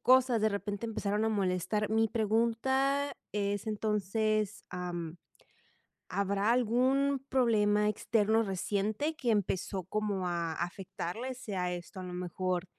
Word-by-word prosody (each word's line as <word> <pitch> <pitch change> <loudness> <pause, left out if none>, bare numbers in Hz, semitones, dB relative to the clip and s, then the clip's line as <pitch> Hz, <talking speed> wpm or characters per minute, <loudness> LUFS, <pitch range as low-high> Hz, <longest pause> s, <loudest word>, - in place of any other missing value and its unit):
cosas, 255 -2 +5
de 220 - +4
repente 205 +1 -3
empezaron 215 -1 0
a - - +3
molestar. 205 +1 0
Mi 225 0 +3
pregunta 235 +6 +1 0.2
es 205 0 -1
entonces. 215 0 0
Am, 175 -2 -4 0.9
¿habrá 200 +2 +1
algún 260 +3 +2
problema 210 -5 +3
externo 220 +1 +2
reciente 210 - -1
que 250 -6 -1
empezó 190 -2 0
como 200 0 -1
a 170 -2 -1
afectarles?, 190 +8 -4
sea 190 -8 -2
esto 175 +2 -7
a - - -6
lo 180 -1 -6
mejor 180 0 -2
210 Hz, 120 wpm, -31 LUFS, 190-230 Hz, 0.9 s, cosas